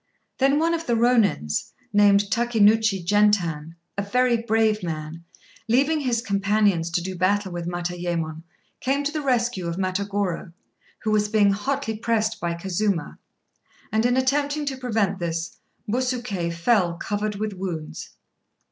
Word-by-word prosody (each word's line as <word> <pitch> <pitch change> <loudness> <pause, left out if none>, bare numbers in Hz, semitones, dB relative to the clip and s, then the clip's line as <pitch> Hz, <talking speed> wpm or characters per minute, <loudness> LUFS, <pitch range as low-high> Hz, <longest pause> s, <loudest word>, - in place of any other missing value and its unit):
Then 275 +2 +4
one 330 +2 +2
of 330 0 -3
the 235 - +2
Rônins, 225 - +1 0.2
named 205 -1 +6
Takénouchi 220 -4 +3
Gentan, 175 -6 +2 0.2
a 200 - -1
very 245 +4 +2
brave 220 -1 +1
man, 160 -1 -5 0.5
leaving 280 +7 +3
his 245 -5 0
companions 200 -4 +1
to 175 0 -1
do 185 0 -4
battle 190 +2 +1
with 175 -1 -4
Matayémon, 175 -2 -3 0.4
came 275 +2 0
to 290 - -1
the 305 0 -3
rescue 240 -8 0
of 170 - -2
Matagorô, 190 -2 -2 0.5
who 215 - 0
was 210 -1 +2
being 205 -2 +4
hotly 265 +3 -2
pressed 220 0 0
by 170 -1 -1
Kazuma, 190 +1 -2 0.7
and, 220 +1 +2
in 245 +1 +2
attempting 285 +3 +1
to 270 -2 -3
prevent 220 -6 0
this, 165 -1 -3 0.3
Busuké 240 -7 -1
fell 170 0 +2
covered 205 +3 -2
with 210 +1 -3
wounds. 180 -5 -5
205 Hz, 140 wpm, -24 LUFS, 175-240 Hz, 0.7 s, named